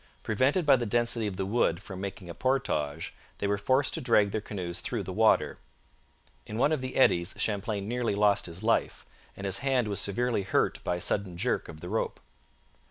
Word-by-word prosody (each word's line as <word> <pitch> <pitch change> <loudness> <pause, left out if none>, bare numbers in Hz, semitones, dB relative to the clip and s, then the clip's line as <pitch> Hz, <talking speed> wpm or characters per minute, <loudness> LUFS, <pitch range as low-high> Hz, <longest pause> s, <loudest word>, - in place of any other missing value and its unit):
Prevented 130 - +2
by 140 -2 +6
the 120 -1 -2
density 120 0 +1
of 100 - -4
the 95 +1 -2
wood 100 -5 +1
from 95 -1 -8
making 100 -2 -6
a 85 - -6
portage, 125 - -1 0.2
they - - -3
were 100 0 +1
forced 130 +6 +2
to - - -3
drag 105 -5 +3
their 110 - -1
canoes 90 -5 -4
through 115 -5 -3
the 95 - -5
water. 110 +2 +3 0.9
In 105 - -5
one 140 +5 +3
of 155 -4 0
the 130 0 -5
eddies 85 -8 +3
Champlain 100 -1 -1
nearly 120 -2 -1
lost 100 -1 +3
his 85 +4 -8
life, 115 +1 +1 0.3
and 100 - -6
his 100 0 0
hand 130 -4 +1
was 100 -1 -1
severely 120 +3 0
hurt 95 - 0
by 90 - 0
a 90 - -5
sudden 95 -4 -1
jerk 125 +8 -1
of 80 -1 -10
the 90 - -6
rope. 110 - -2
105 Hz, 205 wpm, -29 LUFS, 95-120 Hz, 0.9 s, by